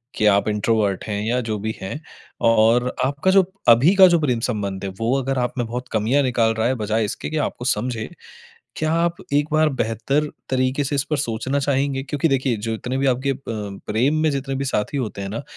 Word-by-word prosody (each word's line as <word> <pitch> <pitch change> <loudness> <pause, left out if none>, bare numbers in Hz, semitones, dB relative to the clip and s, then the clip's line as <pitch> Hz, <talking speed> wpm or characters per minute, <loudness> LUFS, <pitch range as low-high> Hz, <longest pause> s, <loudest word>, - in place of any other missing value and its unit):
कि 110 - 0
आप 100 0 +3
इंट्रोवर्ट 105 -2 0
हैं 105 -1 -3
या 120 +3 +1
जो 110 -2 -3
भी 110 +2 -3
हैं। 95 +11 -5 0.5
और 115 +2 +4 0.2
आपका 145 +7 +1
जो 195 0 +6 0.3
अभी 125 +10 +6
का 190 -1 +9
जो 175 -1 +3
प्रेम 130 -7 0
संबंध 100 -5 -3
है - - -2
वो 115 +2 +1
अगर 135 +1 -2
आप 125 -1 -1
में 120 - 0
बहुत 125 +2 -5
कमियाँ 115 +6 +2
निकाल 115 -3 +2
रहा 110 +1 0
है, 130 - +1
बजाए 110 -1 0
इसके 105 - -5
कि 155 - -3
आपको 135 -4 -2
समझे। 115 -2 -1 0.7
क्या 155 0 0
आप 170 +1 +1 0.2
एक 145 +1 +2
बार 155 0 +4
बेहतर 120 +7 0 0.2
तरीके 130 +2 +1
से 140 - -2
इस 140 - 0
पर 150 - +2
सोचना 130 +1 -2
चाहेंगे? 135 -1 0
क्योंकि 145 +3 -1
देखिए, 130 -3 +1
जो 110 +2 -3
इतने 125 +4 -3
भी 135 - +1
आपके 130 +1 +1
अ, 135 - -1
प्रेम 110 +5 -1
में 155 - +3
जितने 135 -1 -3
भी 135 - -2
साथी 130 0 -1
होते 110 -7 -3
हैं 100 - -4
न, 115 - -4
125 Hz, 220 wpm, -21 LUFS, 110-140 Hz, 0.7 s, का